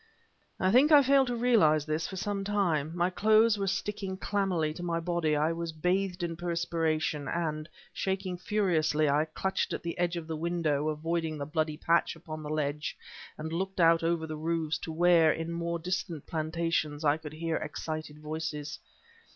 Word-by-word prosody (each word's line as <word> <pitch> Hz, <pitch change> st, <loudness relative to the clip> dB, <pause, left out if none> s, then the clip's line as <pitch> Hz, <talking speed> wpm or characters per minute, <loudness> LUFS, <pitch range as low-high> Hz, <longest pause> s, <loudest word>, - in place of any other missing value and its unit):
I 185 Hz, -, +2 dB
think 270 Hz, +7 st, +5 dB
I 290 Hz, -2 st, +8 dB
failed 270 Hz, 0 st, +4 dB
to 245 Hz, -, -1 dB
realize 205 Hz, -12 st, +4 dB
this 155 Hz, +1 st, -1 dB
for 190 Hz, -, -7 dB
some 200 Hz, +1 st, -2 dB
time. 180 Hz, -7 st, 0 dB
My 175 Hz, +1 st, +2 dB
clothes 215 Hz, +3 st, +4 dB
were 195 Hz, -, -1 dB
sticking 195 Hz, 0 st, -2 dB
clammily 190 Hz, -6 st, 0 dB
to -, -, -6 dB
my 170 Hz, -1 st, -1 dB
body; 165 Hz, -2 st, 0 dB
I 155 Hz, +2 st, +2 dB
was 170 Hz, 0 st, -4 dB
bathed 180 Hz, +3 st, -1 dB
in 165 Hz, -1 st, -2 dB
perspiration, 165 Hz, -3 st, -1 dB
and, 155 Hz, 0 st, -2 dB, 0.2 s
shaking 190 Hz, -1 st, -2 dB
furiously, 170 Hz, -6 st, +1 dB
I 145 Hz, +2 st, +3 dB
clutched 190 Hz, +4 st, -2 dB
at -, -, -4 dB
the 170 Hz, 0 st, -3 dB
edge 175 Hz, 0 st, 0 dB
of 165 Hz, -, -5 dB
the 160 Hz, 0 st, -4 dB
window, 155 Hz, -3 st, 0 dB
avoiding 160 Hz, +1 st, -2 dB
the 140 Hz, -, -4 dB
bloody 155 Hz, 0 st, -1 dB
patch 170 Hz, +1 st, +2 dB
upon 155 Hz, -1 st, -8 dB
the 150 Hz, -, -6 dB
ledge, 150 Hz, -1 st, -2 dB, 0.4 s
and 160 Hz, +1 st, -5 dB
looked 190 Hz, +2 st, -3 dB
out 165 Hz, -1 st, +5 dB
over 165 Hz, -1 st, 0 dB
the 155 Hz, -1 st, -5 dB
roofs 160 Hz, 0 st, -1 dB
to 160 Hz, -, -6 dB
where, 165 Hz, -1 st, +5 dB
in 165 Hz, +1 st, -3 dB
the -, -, -3 dB
more 170 Hz, 0 st, -2 dB
distant 180 Hz, -2 st, -3 dB
plantations, 160 Hz, -1 st, -1 dB
I 145 Hz, +1 st, +4 dB
could 155 Hz, -1 st, -9 dB
hear 165 Hz, 0 st, -2 dB
excited 155 Hz, -1 st, -5 dB
voices. 150 Hz, -1 st, -4 dB
165 Hz, 185 wpm, -30 LUFS, 155-185 Hz, 0.4 s, I